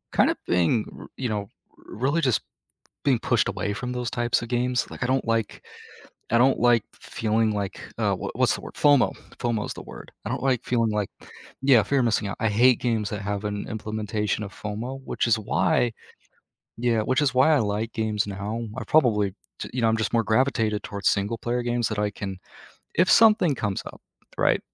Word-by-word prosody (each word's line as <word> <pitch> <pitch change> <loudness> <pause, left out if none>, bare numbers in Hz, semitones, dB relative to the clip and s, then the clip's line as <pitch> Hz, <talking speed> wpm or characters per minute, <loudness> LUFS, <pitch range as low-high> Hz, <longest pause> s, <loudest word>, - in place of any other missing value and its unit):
kinda - - +4
being 90 +6 +2
r - - -10
you 130 -2 -2
know, 105 -2 -3 0.3
really, 140 +8 -2
just, 130 -7 +2 0.6
being 130 -4 +3
pushed 115 -1 +2
away 105 - -2
from 125 +4 -4
those 125 -1 -3
types 120 0 0
of 115 - -6
games, 125 +1 0
like, - - -9
I - - +1
don't 130 +1 +1
like 115 -2 -1 0.7
I 115 - +4
don't 130 +2 +4
like 120 -3 +4
f - - -22 0.2
feeling 110 0 +2
like, 100 -2 -3 0.2
uh, - - +1
what - - -6
what's - - +3
the - - -8
word? - - -9
FOMO. 145 -3 +4 0.3
FOMO 115 -3 -1
is - - -5
the - - -9
word. - - -11
I - - -3
don't - - -3
like 130 -3 +1
feeling 115 -3 +1
like 105 -2 -1 0.5
yeah, 135 -4 +6
fear 140 -1 +1
of 120 - +2
missing 110 -2 +1
out. 100 - -4
I 110 - +2
hate 120 +3 +4
games 110 -4 0
that 105 -2 -4
have 100 +1 -3
an 105 -1 -3
implementation 105 -1 -2
of 100 - -8
FOMO, 115 +6 -5
which - - -1
is 115 -1 +3
why 105 +4 +1 0.8
yeah, 115 -1 +1
which 130 +6 +1
is 140 -4 +2
why 130 +5 +5
I - - +3
like 110 +1 -1
games 110 -2 -1
now. 100 +3 -4 0.2
I 130 - -3
probably, 110 -11 +3 0.3
t - - -5
you 125 - -1
know, 115 - +4
I'm, 110 - +1
just, 110 -2 -2
more 115 -1 +3
gravitated 110 -3 +1
towards 100 -1 -1
single-player 115 +4 -1
games 120 -1 0
that 110 -2 -3
I 105 0 0
can 95 -2 -6 0.6
if 180 +2 +3
something 210 -8 +6
comes 105 -6 -2
up, - - -10 0.4
right, - - +3
115 Hz, 205 wpm, -25 LUFS, 105-125 Hz, 0.8 s, yeah